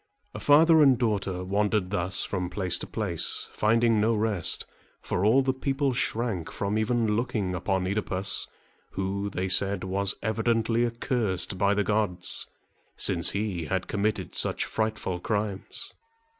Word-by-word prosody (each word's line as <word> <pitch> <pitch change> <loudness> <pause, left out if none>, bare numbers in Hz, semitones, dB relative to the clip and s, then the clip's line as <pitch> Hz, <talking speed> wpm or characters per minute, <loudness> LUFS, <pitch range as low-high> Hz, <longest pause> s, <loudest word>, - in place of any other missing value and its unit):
Father 160 +2 +6
and 135 -4 +6
daughter 100 -6 -1
wandered 100 0 0
thus 90 -1 0
from 90 -2 -3
place 95 -1 0
to - - -6
place, - - 0
finding 115 0 +2
no 115 +2 +2
rest; 105 -5 0 0.3
for 90 - -2
all 120 +6 +4
the 130 0 +1
people 135 +1 -1
shrank 115 -8 -2
from 100 +1 -2
even 110 -1 +1
looking 105 -5 -1
upon 95 +1 -1
OEdipus, 100 -1 -2 0.5
who, 100 +1 -2
they 95 -1 -3
said, 100 +1 +2
was 95 +1 0
evidently 115 +1 +1
accursed 115 -6 -2
by 100 +1 +3
the 105 - +1
gods, 100 -4 0 0.5
since 85 - +3
he 100 -5 -2
had 95 +3 -2
committed 100 -3 -2
such - - +1
frightful 110 -5 -2
crimes. 105 0 -3
105 Hz, 140 wpm, -27 LUFS, 95-115 Hz, 0.5 s, Father